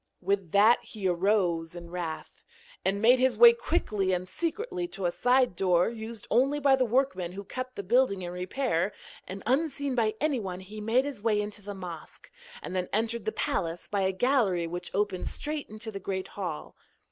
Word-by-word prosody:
With 195 -2 -1
that 215 +4 +5
he 205 -4 -4
arose 175 -3 +1
in 170 -1 -9
wrath, 170 -3 -6 0.4
and 200 +2 0
made 250 +3 +6
his 255 -3 +2
way 235 +1 +10
quickly 210 - 0
and 180 0 -2
secretly 360 - -3
to 195 - -6
a 175 - +2
side 250 0 +2
door, 180 0 +3
used 225 -1 -7
only 275 +4 +3
by 275 -2 +5
the 260 -1 +1
workmen 230 -8 0
who 200 +1 -6
kept 255 +4 -6
the 200 - -5
building 210 -2 +2
in 175 - -4
repair, 185 +1 -1 0.3
and, 195 +1 -7
unseen 280 +2 0
by 220 -3 +1
anyone, 225 -12 -1
he 210 +3 -9
made 235 +5 +2
his 280 -7 -5
way 215 -1 +2
into 210 0 -4
the 205 0 -7
mosque, 175 -4 -9 0.3
and - - -5
then 180 -1 -1
entered 225 +1 -1
the 220 - 0
palace 170 -4 -2
by 200 -1 -1
a 190 0 +2
gallery 195 -5 +2
which 175 +1 -5
opened 200 -2 0
straight 300 -1 -3
into 215 +1 -5
the 200 - -6
great 190 0 -4
hall. 180 -6 -5
205 Hz, 190 wpm, -28 LUFS, 185-250 Hz, 0.4 s, way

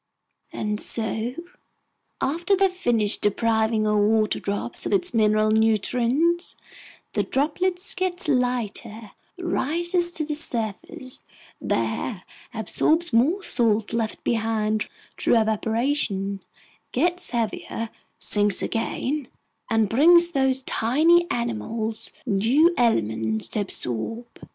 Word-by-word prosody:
And 210 0 -3
so, 225 +2 -1 0.9
after 340 +8 +1
they've 385 0 +3
finished 235 - +1
depriving 220 +1 +1
our 210 0 +2
water 215 +1 +2
drop 200 0 -2
of - - -2
its 365 -6 +2
mineral 215 -1 +3
nutrients, 240 - +2 0.6
the - - +1
droplet 355 +6 0 0.2
gets 370 -1 -1
lighter, 235 -5 -1 0.3
rises 345 +1 0
to 310 - -1
the 300 - -3
surface, 250 -2 -3 0.4
there - - -2 0.3
absorbs 325 -2 0
more 310 - +3
salts 225 -7 +1
left 225 -2 -2
behind 220 -2 0 0.3
through 235 - +4
evaporation, 220 -2 0 0.5
gets 355 +6 0
heavier, 230 -1 -3 0.3
sinks 205 -1 +2
again, 265 +4 -2 0.4
and 225 -2 +2
brings 340 - +5
those 265 -3 +1
tiny 325 +11 +3
animals 225 -2 -3
new 250 - +3
elements 110 - 0
to - - -2
absorb. 200 - -3
235 Hz, 105 wpm, -24 LUFS, 215-305 Hz, 0.9 s, brings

